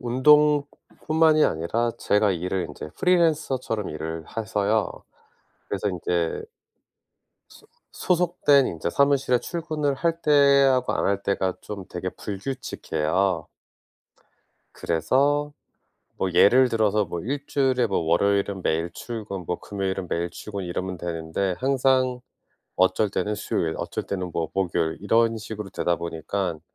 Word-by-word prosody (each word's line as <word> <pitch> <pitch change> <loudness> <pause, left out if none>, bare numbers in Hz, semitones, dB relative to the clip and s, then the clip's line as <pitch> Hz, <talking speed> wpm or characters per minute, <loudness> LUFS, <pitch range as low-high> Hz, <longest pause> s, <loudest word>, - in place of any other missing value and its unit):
운동뿐만이 150 +4 +3
아니라 115 +9 -1
제가 105 0 +2
일을 90 +1 -2
인제 - - -8
프리랜서처럼 155 - +1
일을 80 +1 -5
해서요. 105 -1 -1 0.8
그래서 100 +1 -1
인제 85 -2 -1 1.1
소 - - -18 0.3
소속된 170 -6 +3
인제 80 0 -3
사무실에 135 +1 +2
출근을 155 -4 -2
할 165 +3 -1
때하고 140 -3 +4
안 - - 0
할 100 0 0
때가 95 -2 0
좀 100 -3 -7
되게 95 +1 -4
불규칙해요. 95 - -2 1.3
그래서 140 - +1 0.6
뭐 95 - -1
예를 125 +8 +6
들어서 110 -2 +2
뭐 85 -1 -5
일주일에 135 - 0
뭐 100 - 0
월요일은 100 +3 +1
매일 80 +2 0
출근 105 -2 -6
뭐 90 - -2
금요일은 95 -2 -3
매일 85 +1 -2
출근 100 +1 -6
이러면 90 +1 -4
되는데 85 +2 -2
항상 130 -1 +2 0.6
어쩔 95 +3 +3
때는 105 +2 -2
수요일 80 -4 -2
어쩔 - - -4
때는 90 -2 -4
뭐 80 -1 -2
목요일 85 -4 0
이런 115 +2 +2
식으로 105 -2 -7
되다 85 -1 0
보니깐 85 +1 -3
105 Hz, 280 characters per minute, -24 LUFS, 90-135 Hz, 1.3 s, 예를